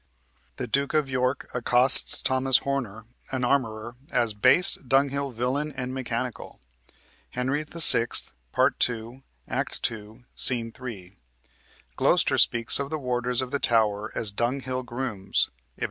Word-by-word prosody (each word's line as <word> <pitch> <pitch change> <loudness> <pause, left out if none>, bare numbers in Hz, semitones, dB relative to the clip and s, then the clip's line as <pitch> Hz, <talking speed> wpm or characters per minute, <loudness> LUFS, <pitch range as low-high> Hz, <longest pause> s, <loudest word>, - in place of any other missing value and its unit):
The - - -5
Duke 140 +5 -2
of 145 -3 0
York 130 +1 -2
accosts 125 +1 +6
Thomas 130 0 +2
Horner, 120 -6 -5 0.3
an 130 -1 -3
armorer, 120 -3 -2
as 115 -3 0
"base 130 - +4
dunghill 140 +1 -1
villain 130 +5 -3
and 125 0 -5
mechanical" 125 -1 -6 0.7
(Henry 130 +4 -3
VI., 150 -7 +5 0.4
Part - - 0
2, 120 +2 -3 0.3
Act - - -2
2, 110 +1 -6
Sc. - - +5 0.2
3); 100 -7 -10 0.8
Gloster - - +2
speaks 115 +2 +3
of 140 0 -4
the 155 - -4
warders 125 -2 -2
of 125 - -9
the 140 - -2
Tower 110 -3 0
as 110 -3 -2
"dunghill 130 +4 -3
grooms" 120 -6 -3 0.3
(Ib. - - -23
125 Hz, 130 wpm, -24 LUFS, 115-135 Hz, 0.8 s, accosts